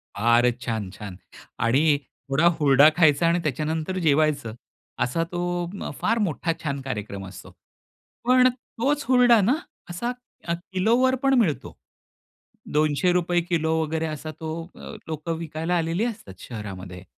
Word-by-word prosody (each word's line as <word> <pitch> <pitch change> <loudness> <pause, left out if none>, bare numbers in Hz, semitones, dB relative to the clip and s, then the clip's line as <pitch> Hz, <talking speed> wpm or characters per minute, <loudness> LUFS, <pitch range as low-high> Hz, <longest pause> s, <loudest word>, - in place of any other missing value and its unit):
फारच 120 +3 +3
छान-छान! 105 -4 -5 0.4
आणि 145 +7 +3 0.3
थोडा 140 +5 +2
हुरडा 145 +1 +6
खायचा 160 -1 +4
आणि 170 +1 +2
त्याच्यानंतर 155 +5 -2
जेवायचं. 145 -6 +2 0.5
असा 165 +7 0
तो 175 - -3 0.2
उम्म, 185 +4 -6
फार 230 +2 +2
मोठा 165 0 -1
छान 140 -2 -2
कार्यक्रम 105 -6 -5
असतो. 95 - -11 0.7
पण 255 +1 +6
तोच 270 +3 -2
हुरडा 245 -3 +6
ना, 230 +8 +3 0.4
असा 210 +8 -3 0.4
अ, 170 - +1
किलोवर 220 +9 +1
पण 270 - +4
मिळतो. 170 -11 -1 1.0
₹200 175 +4 +2
किलो 165 -2 0
वगैरे 160 +1 -1
असा 155 0 -5
तो 160 - -5 0.3
अ, - - -9 0.2
लोक 155 +1 -5
विकायला 165 +1 -2
आलेली 165 +7 0
असतात 205 - -6
शहरामध्ये. 95 -5 -8
160 Hz, 130 wpm, -24 LUFS, 135-180 Hz, 1.0 s, हुरडा